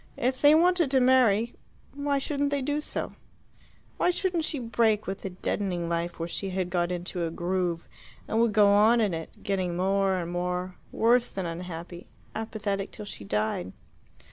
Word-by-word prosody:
If 255 +1 -1
they 295 +1 +7
wanted 345 -2 +4
to 265 -1 +3
marry, 240 -3 +4 0.4
why 285 0 0
shouldn't 285 +1 0
they 285 -1 -1
do 290 +3 -1
so? - - -4 0.8
Why - - +2
shouldn't 355 -2 0
she 305 - -1
break 225 -3 +1
with 195 +1 -4
the 195 - -4
deadening 180 -1 -2
life 170 0 -2
where 165 - -3
she 195 +3 -4
had 185 -1 -2
got 175 -1 0
into 180 0 -3
a 165 - -1
groove, 175 0 -2 0.4
and 220 - 0
would 235 -1 +3
go 210 -1 +5
on 215 +4 +5
in 210 -5 +1
it, 165 0 -4
getting 185 -3 -1
more 195 +1 +2
and 175 -1 -4
more 180 +1 -2 0.2
worse 240 +2 +3
than 190 -2 -4
unhappy 170 +1 -7 0.3
apathetic 210 -3 -3
till 210 - -8
she 155 - -8
died? 105 -3 -2
195 Hz, 175 wpm, -27 LUFS, 175-245 Hz, 0.8 s, they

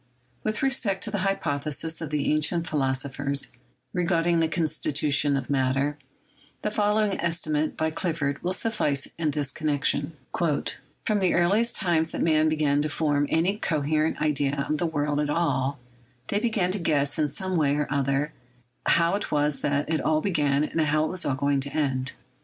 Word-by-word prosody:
With 215 +3 -1
respect 225 -8 +1
to 215 - -1
the 205 - -1
hypotheses 160 -4 -1
of 160 - -4
the 150 -1 0
ancient 155 +3 +1
philosophers 140 0 -1 0.4
regarding 175 -1 +2
the 165 - +3
constitution 150 -3 +1
of 135 - -4
matter, 135 +2 0 0.6
the 210 - 0
fol 210 0 +2
lowing 210 -2 +1
estimate 155 -3 -1
by 160 0 0
Clifford 155 -4 -2
will 180 - -1
suffice 185 - 0
in 160 -2 +1
this 145 -2 -1
connection: 150 0 0 0.2
"From 170 +6 -2
the 185 -3 +2
earliest 205 +7 +3
times 165 -4 +1
that - - -2
men 155 -1 +3
began 150 -2 +2
to 155 - 0
form 145 -1 +1
any 180 +6 +1
coherent 155 -4 0
idea 145 -2 +1
of 155 -1 -1
[the 170 - +1
world] 145 -2 -1
at 150 -1 0
all, 140 -4 0 0.5
they 205 - +1
began 210 -5 0
to 200 - -1
guess 145 -4 +1
in 150 -1 +2
some 185 +6 -3
way 145 -4 +2
or 150 0 0
other 140 +1 0 0.5
how 170 +1 +4
it 205 0 -2
was 145 -1 +1
that 145 0 0
it 155 -2 0
all 155 +2 +2
began, 150 -6 +1
and 160 +1 -1
how 155 0 +2
it - - -2
was 185 -1 0
all 135 - +1
going 140 0 +1
to 140 +1 -2
end. 135 -3 0
155 Hz, 175 wpm, -26 LUFS, 145-170 Hz, 0.6 s, how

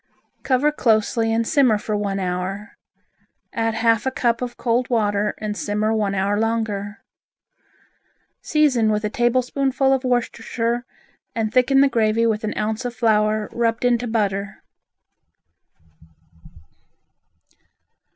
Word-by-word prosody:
Cover 270 +3 +2
closely 225 -3 +1
and 225 0 0
simmer 255 -7 +3
for 210 +1 -3
one 200 -1 -2
hour, 185 +3 -4 0.8
add 225 -1 -1
half 230 +2 +2
a - - +4
cup 240 -2 0
of 245 -1 -5
cold 245 +1 0
water 210 -3 0
and 210 -1 -4
simmer 210 +1 -1
one 205 -3 0
hour 200 +2 0
longer. 220 -2 -2 1.4
Season 275 -8 +2
with 210 0 0
a 210 - -2
tablespoonful 260 +3 +1
of 265 -1 0
Worcestershire 240 -1 -1 0.5
and 220 -1 -2
thicken 270 +2 +4
the 280 - +5
gravy 230 -2 +1
with 220 -1 0
an 215 - -3
ounce 215 +3 -2
of 245 -1 -5
flour 215 -2 +1
rubbed 230 0 -1
into 245 0 +1
butter. 200 -3 -2
225 Hz, 120 wpm, -21 LUFS, 210-245 Hz, 1.4 s, the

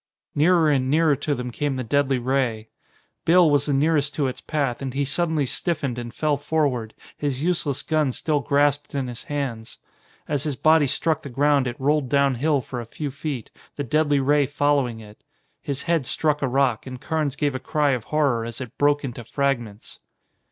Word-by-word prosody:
Nearer 165 +2 +4
and 130 -2 +1
nearer 155 0 +3
to 145 +2 -1
them 125 -1 -5
came 145 +2 -2
the 130 - -3
deadly 140 +2 +1
ray. 120 -3 -1 0.5
Bill 175 +1 +5
was 145 0 +2
the 145 - +1
nearest 150 +1 +1
to 145 - 0
its 130 -1 -3
path, 140 -6 -2
and 135 -1 -4
he 140 +1 +1
suddenly 160 0 0
stiffened 140 -3 -2
and 120 -1 -6
fell 150 +4 0
forward, 140 -7 -1 0.2
his 140 -1 -2
useless 160 -6 0
gun 155 -4 +1
still 150 +3 0
grasped 145 +1 +1
in 135 -2 -1
his 120 -2 -6
hands. 135 -7 -4 0.5
As 145 -2 -1
his 145 -2 -2
body 155 +1 +4
struck 155 +3 +1
the 140 - -8
ground 140 +1 +2
it 120 - -5
rolled 145 -1 +1
down 140 0 +3
hill 140 +3 +1
for 125 -1 -6
a - - -8
few 145 +4 -5
feet, 140 -4 -5 0.2
the 145 - -3
deadly 145 +2 +2
ray 145 +1 +3
following 145 -5 +1
it. 105 -1 -14 0.4
His 140 -1 -3
head 165 -6 0
struck 150 -2 +1
a 135 - +1
rock, 130 -2 +1
and 130 -1 -7
Carnes 150 -1 -1
gave 145 -1 0
a 130 - -3
cry 145 +2 +1
of 125 -4 -2
horror 140 -7 +1
as 115 +2 -6
it 125 -4 -8
broke 145 0 +3
into 120 -2 -6
fragments. 120 -5 -3
140 Hz, 195 wpm, -23 LUFS, 130-150 Hz, 0.5 s, Bill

